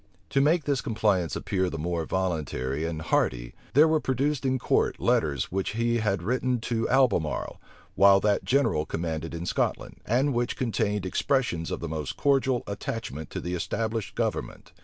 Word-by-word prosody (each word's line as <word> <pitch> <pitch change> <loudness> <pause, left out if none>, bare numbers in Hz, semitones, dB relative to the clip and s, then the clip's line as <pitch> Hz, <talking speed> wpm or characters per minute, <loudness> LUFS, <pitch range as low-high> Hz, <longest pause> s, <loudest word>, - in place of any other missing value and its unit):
To 135 - +3
make 155 +3 +3
this 140 -3 0
compliance 105 -7 0
appear 95 -1 -1
the 80 - -5
more 85 +1 -2
voluntary 80 -6 -2
and 80 -2 -4
hearty, - - 0 0.2
there 150 +3 +7
were 155 0 +3
produced 135 0 0
in 130 0 +1
court - - +1
letters 70 -4 +1
which 95 +2 -2
he 115 +1 +1
had 105 -2 0
written 125 +1 0
to 115 -1 -1
Albemarle, 120 - +1 0.3
while 100 0 +6
that 105 0 +2
general 115 - +2
commanded 80 0 -3
in 85 +1 -5
Scotland, - - -2
and 135 +5 +2
which 120 0 -1
contained 105 -5 -1
expressions 95 - 0
of - - -4
the - - -3
most 75 -2 -4
cordial 135 -3 +2
attachment 100 - -5
to - - -5
the 90 - -4
established 110 +4 -2
government. - - -3
105 Hz, 165 wpm, -27 LUFS, 80-125 Hz, 0.3 s, there